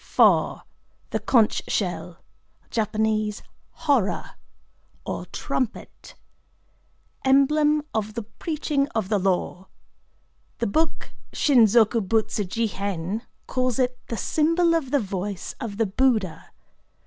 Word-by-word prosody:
IV.—The - - +1
Conch 225 -4 +4
Shell - - -2 0.5
(Jap. 215 -1 0 0.3
"Hora") 280 -11 0 0.7
or - - -4
Trumpet. 250 -4 -4 1.1
Emblem 295 +3 +4
of 215 -1 -2
the 230 - -3
preaching 285 +5 -2
of 215 -4 -1
the 210 -2 +2
Law. 185 0 -1 0.9
The - - -1
book 320 +8 -1 0.2
Shin 255 -6 +5
zoku 225 +1 +4
butsu 215 +1 0
ji 230 +5 -1
hen 200 0 -3 0.2
calls 255 -2 0
it 250 -1 0
the 230 - -4
symbol 330 - +2
of 320 -6 0
the 285 - +2
voice 195 -2 -4
of 205 -3 -5
the 225 - +2
Buddha. 215 -4 0
225 Hz, 110 wpm, -24 LUFS, 205-275 Hz, 1.1 s, Shin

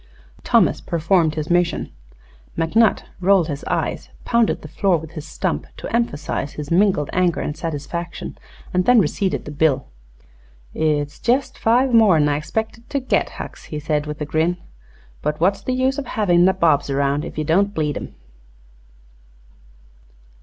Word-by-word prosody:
Thomas - - +3
performed 165 -1 +1
his 155 +1 -3
mission. 175 0 +1 0.7
McNutt 200 +7 +3 0.2
rolled 185 -2 +3
his 145 -1 -4
eyes, - - -2 0.2
pounded 235 -2 +1
the - - -7
floor 190 -3 +1
with 160 0 -9
his 160 -2 -8
stump - - -2
to - - -4
emphasize 145 - -2
his 150 0 -7
mingled 185 -5 +2
anger 180 -2 +2
and 150 - -3
satisfaction, 165 +2 -5 0.4
and 180 0 +2
then 250 0 +5
receipted 190 +2 0
the 150 - -7
bill. 150 -2 +1 0.9
"It's 145 -2 -1
jest 255 +3 +1
five 245 +3 +2
more'n 190 -10 +5
I 145 0 0
'spected 220 +8 -4
to 280 - 0
git, 260 - 0
Hucks," - - -8
he 155 - -6
said 150 0 -1
with 150 0 -5
a - - -1
grin. 160 +4 0 0.6
"But 150 0 -2
what's 195 +4 +2
the 255 - -2
use 260 +2 +1
o' - - -3
havin' 180 -8 +2
nabobs 165 -7 +3
around, 140 +1 0
ef - - -8
ye 155 - 0
don't 195 +7 +2
bleed 150 -5 -1
'em?" - - -7
170 Hz, 155 wpm, -21 LUFS, 150-200 Hz, 0.9 s, then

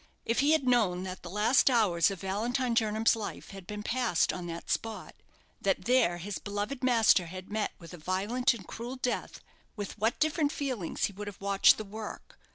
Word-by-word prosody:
If 230 - +1
he 290 +3 +4
had 315 - +2
known 220 -8 +2
that 185 0 -6
the 175 - -8
last 210 +9 +4
hours 205 -9 +3
of 195 -3 -6
Valentine 235 +6 -1
Jernam's 220 0 +2
life 220 -2 -6
had 195 -2 -10
been 210 0 -5
passed 235 -7 +1
on 180 -1 -5
that 170 0 -6
spot, 225 -1 -3 0.5
that - - 0
there 245 -9 +3
his 195 +3 -5
beloved 205 +6 -4
master 225 -8 +4
had 185 +3 -9
met 215 0 -1
with 170 +1 -12
a - - -8
violent 205 +10 +1
and 195 -5 -10
cruel 240 +3 -6
death, 250 -1 -3 0.3
with 205 0 -6
what 225 +3 +1
different 310 -1 +1
feelings 255 - -2
he 200 - -4
would 205 +2 -7
have 205 - -8
watched 200 0 +5
the 215 - -5
work! 215 +2 -9
210 Hz, 195 wpm, -30 LUFS, 190-245 Hz, 0.5 s, watched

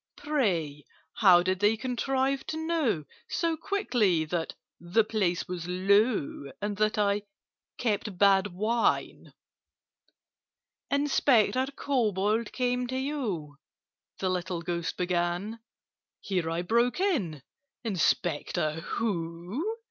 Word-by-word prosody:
Pray, 180 - -1 0.3
how 180 -5 +6
did 185 0 0
they 210 +2 +3
contrive 265 +3 0
to 315 - -3
know 320 - 0 0.3
So 335 -1 0
quickly 240 - +1
that 165 +1 -3 0.2
'the 175 +7 +2
place 200 -5 -1
was 180 -1 -5
low,' 190 - +1
And 205 0 -2
that 215 +1 +1
I 205 0 +2 0.6
'kept 210 -4 -1
bad 195 0 +5
wine'?" 215 +5 0 1.6
"Inspector 265 -3 +3
Kobold 220 -4 0
came 250 -1 0
to 260 +1 -3
you—" 220 - -3 0.6
The 185 -1 -1
little 180 -1 -3
Ghost 170 0 -3
began. 180 +4 -1 0.6
Here 180 -4 -1
I 165 +1 -1
broke 235 - +2
in—"Inspector 180 - -1 0.2
who? 200 - -2
205 Hz, 100 wpm, -28 LUFS, 175-250 Hz, 1.6 s, how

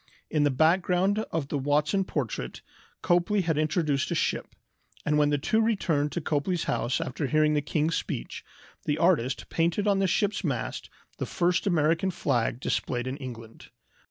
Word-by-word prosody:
In 155 - +2
the 145 - +4
background 180 +7 +2
of 155 -4 -2
the 145 - -1
Watson 150 +7 +1
portrait 120 - -4 0.4
Copley 175 +4 +2
had 165 -3 0
introduced 155 -3 0
a - - -1
ship, - - -1 0.5
and 150 0 +2
when 145 -1 +4
the 145 - +2
two 190 +10 +1
returned 165 -10 +1
to 175 - -2
Copley's 155 +4 -1
house 120 - 0
after 135 +3 -3
hearing 155 +1 +3
the 150 - +2
king's 155 +2 0
speech, - - -5 0.4
the 150 - 0
artist 150 -8 +1
painted 170 +5 0
on 200 -1 +3
the 195 - +2
ship's 205 +3 0
mast 135 -9 -3 0.3
the - - -2
first 175 +2 +1
American 165 +1 +2
flag 125 -9 0
displayed 120 -1 -1
in 130 +2 -4
England. 115 -5 -9
155 Hz, 165 wpm, -27 LUFS, 140-180 Hz, 0.5 s, the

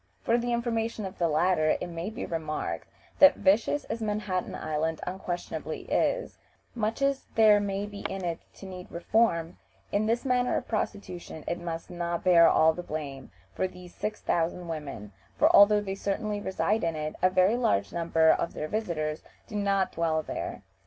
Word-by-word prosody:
For 230 - +2
the 240 +1 -2
information 230 -2 -1
of 190 - -8
the 170 - +3
latter 155 0 +2
it - - -3
may 170 +2 -5
be 220 - -5
remarked, 160 -2 -3 0.3
that 285 - +8
vicious 210 +9 +2
as 230 - -5
Manhattan 210 -4 -2
Island 155 +1 -2
unquestionably 180 -1 -4
is, - - 0 0.3
much 225 +3 -1
as 275 -1 0
there 215 -2 +6
may 200 0 -2
be 205 -1 -8
in 190 -1 -4
it 170 -1 -2 0.2
to - - -11
need 185 -1 -8
reform, 170 -2 +1 0.3
in 210 +1 +1
this 235 +4 0
matter 250 -1 +2
of - - -5
prostitution 185 -7 -4
it 170 - -2
must 165 -1 -5
not 170 -1 -3
bear 170 -2 +7
all 160 0 +5
the 175 - -5
blame 145 -5 -6 0.3
of 185 0 -1
these 180 -1 -12
six 210 0 -4
thousand 170 +1 -1
women, 140 -10 -6 0.3
for - - +5
although 205 +1 +7
they 195 -2 -4
certainly 205 +1 -2
reside 205 +3 0
in 165 -1 0
it, 155 0 -4
a 185 - +5
very 185 +4 +3
large 100 - +1
number 165 -1 +3
of - - -1
their 150 - -3
visitors 155 -7 -2 0.2
do - - -9
not 200 -2 +1
dwell 160 -1 0
there. - - -5
185 Hz, 180 wpm, -28 LUFS, 165-210 Hz, 0.3 s, that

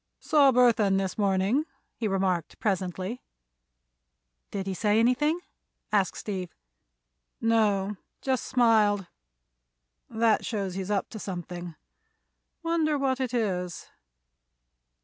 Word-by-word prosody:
"Saw 290 -4 +5
Burthon 230 -6 +4
this 190 -2 -1
morning," 200 +7 +1 0.3
he 225 - -2
remarked, 190 -4 -1
presently. 190 +3 -2 1.3
"Did 195 -1 -4
he 195 - -2
say 210 +3 +2
anything?" 255 +8 +3 0.5
asked 200 -4 +1
Steve. 185 -5 -5 0.8
"No. 210 -3 +2 0.2
Just 260 -2 -1
smiled. 220 -5 +3 1.0
That 225 -1 +2
shows 200 -6 -2
he's 190 +1 -4
up 200 -2 -1
to 220 - -7
something. 175 -3 -6 0.9
Wonder 325 -3 +1
what 270 -1 0
it 255 -3 -1
is." 185 -8 -2
210 Hz, 105 wpm, -27 LUFS, 190-245 Hz, 1.3 s, Saw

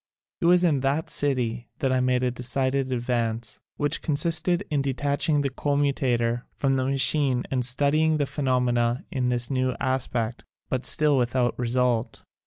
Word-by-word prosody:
It - - +1
was 180 +1 +5
in 155 -6 +2
that 140 +4 -1
city 120 -4 0
that 135 -3 0
I 130 - +2
made 125 0 +1
a 125 - +1
decided 130 +2 -1
advance, 120 -2 -2 0.2
which 145 +2 -1
consisted 165 +4 +1
in 145 -2 +1
detach 140 +3 -1
ing 145 -2 +3
the 140 - -1
commutator 130 -5 0
from 135 -1 0
the 130 -1 0
machine 135 -1 +2
and 130 -2 0
studying 145 +5 +2
the 145 - 0
phenomena 125 -3 0
in 125 -2 -1
this 120 +1 +1
new 130 -1 0
aspect, 125 -3 -2 0.3
but 130 -1 0
still 150 -3 +3
without 125 0 0
result. 120 -1 -1
130 Hz, 160 wpm, -25 LUFS, 125-145 Hz, 0.3 s, was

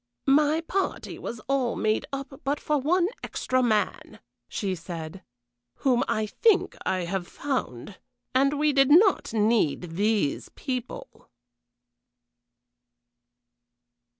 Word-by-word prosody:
"My 300 +3 +4
party 380 +3 -3
was 235 - -6
all 260 0 0
made 215 0 0
up 275 0 -6
but 285 +2 -1
for 300 -1 0
one 345 +6 +2
extra 255 0 -1
man," 220 -4 -1 0.3
she 195 -3 -2
said, 170 0 -7 0.5
"whom 250 -3 +2
I 215 - 0
think 405 - +2
I 185 -1 +1
have 175 +1 -3
found; 205 - -4 0.3
and 275 +3 +3
we 300 0 +2
did 275 0 +4
not 375 +6 +5
need 205 -7 +1
these 205 -7 0
people." 260 - -6
255 Hz, 110 wpm, -26 LUFS, 200-290 Hz, 0.5 s, not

